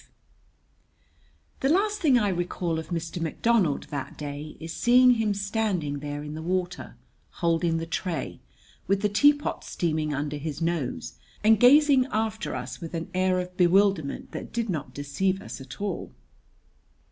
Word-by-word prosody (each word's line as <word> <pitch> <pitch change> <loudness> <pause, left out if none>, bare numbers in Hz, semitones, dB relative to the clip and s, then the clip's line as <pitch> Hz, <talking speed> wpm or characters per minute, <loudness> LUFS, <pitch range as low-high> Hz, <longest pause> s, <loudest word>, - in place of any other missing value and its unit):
V - - -24 1.5
The 270 - +1
last 415 +1 0
thing 280 -7 +5
I 210 -4 +2
recall 175 -2 -2
of 160 - -7
Mr. 170 0 -4
McDonald 175 0 +1
that 140 -2 -5
day 145 +1 -6
is 165 0 -6
seeing 250 +1 +5
him 220 -4 +1
standing 200 -8 -1
there 145 0 -5
in 150 0 -6
the 155 - -6
water, 180 +1 -3 0.4
holding 165 -1 +1
the 165 - -3
tray, 170 0 -3 0.5
with 195 +2 +1
the 210 - +3
teapot 290 +8 +3
steaming 155 -3 -1
under 145 +1 -2
his 150 0 -5
nose, 160 - -2 0.2
and 220 0 +5
gazing 275 +1 +6
after 220 - -2
us 125 0 -6
with 165 0 -6
an 165 0 -5
air 185 0 +2
of 180 0 -5
bewilderment 180 -4 +2
that - - -7
did 230 -3 -1
not 155 -5 -4
deceive 165 +7 -1
us 145 - -8
at 130 -1 -10
all. 200 -3 -3
180 Hz, 160 wpm, -26 LUFS, 155-215 Hz, 1.5 s, gazing